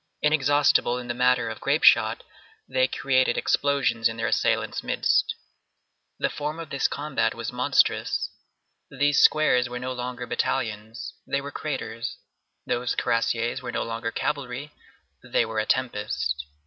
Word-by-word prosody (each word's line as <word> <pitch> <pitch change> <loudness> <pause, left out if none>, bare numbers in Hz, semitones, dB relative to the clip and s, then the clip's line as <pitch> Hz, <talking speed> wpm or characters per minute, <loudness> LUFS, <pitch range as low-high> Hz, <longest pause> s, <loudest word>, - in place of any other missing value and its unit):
Inexhaustible 145 -4 +3
in 125 -1 -6
the - - 0
matter 125 -1 +2
of 110 -1 -5
grape - - +1
shot, - - +5 0.4
they 130 0 +2
created 130 -1 +1
explosions 140 -5 +2
in 115 - -7
their 115 - -2
assailants' - - +1
midst. - - +1 0.8
The - - 0
form 150 +2 -4
of 165 -3 -8
this 140 - +1
combat 145 -1 -1
was - - -4
monstrous. - - +1 0.6
These 145 +1 +2
squares 125 -5 +4
were 125 - -5
no 130 +1 -4
longer 125 0 -5
battalions, 115 -2 -3
they 140 - 0
were 140 +1 -7
craters; 115 -7 -4 0.5
those 120 0 -1
cuirassiers 115 +1 0
were 125 -2 -5
no - - -1
longer 115 0 -3
cavalry, 140 +2 -3 0.5
they - - +1
were 110 -1 -3
a 110 - -1
tempest. 105 - -1
125 Hz, 145 wpm, -25 LUFS, 115-140 Hz, 0.8 s, shot